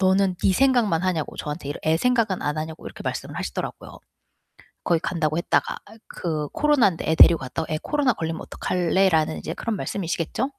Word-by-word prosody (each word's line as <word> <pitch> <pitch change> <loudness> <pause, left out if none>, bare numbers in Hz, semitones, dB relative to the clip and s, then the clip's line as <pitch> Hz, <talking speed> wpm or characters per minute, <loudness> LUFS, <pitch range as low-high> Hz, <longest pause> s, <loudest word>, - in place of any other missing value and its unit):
"너는 190 -1 +3
네 190 - +4
생각만 235 -7 +3
하냐?"고 180 -5 -1
저한테 150 -1 -5
이렇게 155 +2 -2
"애 160 - +4
생각은 230 -5 +1
안 150 +1 -1
하냐?"고 160 +1 -6
이렇게 - - -9
말씀을 - - -4
하시더라고요. - - -5 0.9
거기 170 -2 +2
간다고 155 -3 -1
했다가 170 - 0
아이 220 +2 -15
그 155 -4 -3
"코로난데 260 - +2
애 160 - +3
데리고 170 0 +8
갔다가 135 +5 -4
애 155 - 0
코로나 285 -5 +1
걸리면 160 0 -4
어떡할래?"라는 175 -3 +1
인제 - - -5
그런 230 -3 -3
말씀이시겠죠? 175 +2 -2
175 Hz, 455 characters per minute, -24 LUFS, 160-200 Hz, 0.9 s, 데리고